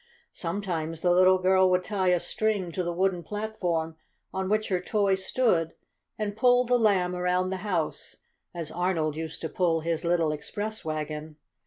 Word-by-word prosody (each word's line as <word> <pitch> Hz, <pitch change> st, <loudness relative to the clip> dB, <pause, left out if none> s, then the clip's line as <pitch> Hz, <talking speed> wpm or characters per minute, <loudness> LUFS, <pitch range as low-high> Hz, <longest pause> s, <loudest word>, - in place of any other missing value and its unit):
Sometimes 165 Hz, -3 st, -3 dB
the 180 Hz, -, +3 dB
little 185 Hz, +1 st, +6 dB
girl 185 Hz, 0 st, +4 dB
would 180 Hz, 0 st, +2 dB
tie 195 Hz, -1 st, -1 dB
a 180 Hz, -1 st, +4 dB
string 205 Hz, -2 st, -1 dB
to 185 Hz, -, -2 dB
the 175 Hz, -1 st, -2 dB
wooden 180 Hz, 0 st, 0 dB
platform, 175 Hz, -5 st, -3 dB, 0.4 s
on 190 Hz, 0 st, -2 dB
which 215 Hz, +1 st, +1 dB
her 185 Hz, -2 st, 0 dB
toy 200 Hz, +1 st, +1 dB
stood, 190 Hz, -4 st, +1 dB, 0.4 s
and 205 Hz, -1 st, -3 dB
pull 245 Hz, +2 st, +4 dB
the 245 Hz, 0 st, +3 dB
Lamb 185 Hz, -5 st, +2 dB
around 180 Hz, +1 st, 0 dB
the 190 Hz, -, -2 dB
house, 185 Hz, -5 st, -3 dB, 0.4 s
as 165 Hz, -3 st, -5 dB
Arnold 170 Hz, -4 st, 0 dB
used 160 Hz, 0 st, -6 dB
to 160 Hz, -, -2 dB
pull 165 Hz, -2 st, +1 dB
his 165 Hz, +1 st, -2 dB
little 170 Hz, -2 st, +2 dB
express 205 Hz, +8 st, -5 dB
wagon. 155 Hz, 0 st, -4 dB
180 Hz, 170 wpm, -27 LUFS, 165-200 Hz, 0.4 s, little